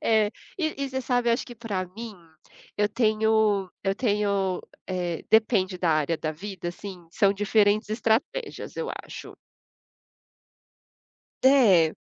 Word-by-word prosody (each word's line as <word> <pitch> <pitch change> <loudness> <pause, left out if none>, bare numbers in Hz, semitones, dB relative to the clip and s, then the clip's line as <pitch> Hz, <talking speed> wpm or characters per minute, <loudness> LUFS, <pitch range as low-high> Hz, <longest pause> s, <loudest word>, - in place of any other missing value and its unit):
É, 215 -2 +3 0.3
e 315 -4 -1
e - - -3
você 265 - -2
sabe, 245 -1 0
eu - - +5
acho 235 - -1
que, 245 - -9
pra 210 -5 -3
mim, 230 -2 -7 0.6
eu 210 0 +2
tenho 215 -3 +2
eu 195 0 0
tenho, 200 -4 0 0.3
eh, 175 -3 -3
depende 205 -4 +3
da 175 -2 +1
área 155 +1 +1
da 155 0 -3
vida, 185 +1 -6
assim, 180 -1 -8
são 200 +2 +3
diferentes 205 +1 +2
estratégias. 240 - -1
Eu - - -3
acho. - - -10 2.1
É. 210 - +5
210 Hz, 135 wpm, -26 LUFS, 185-230 Hz, 2.1 s, eu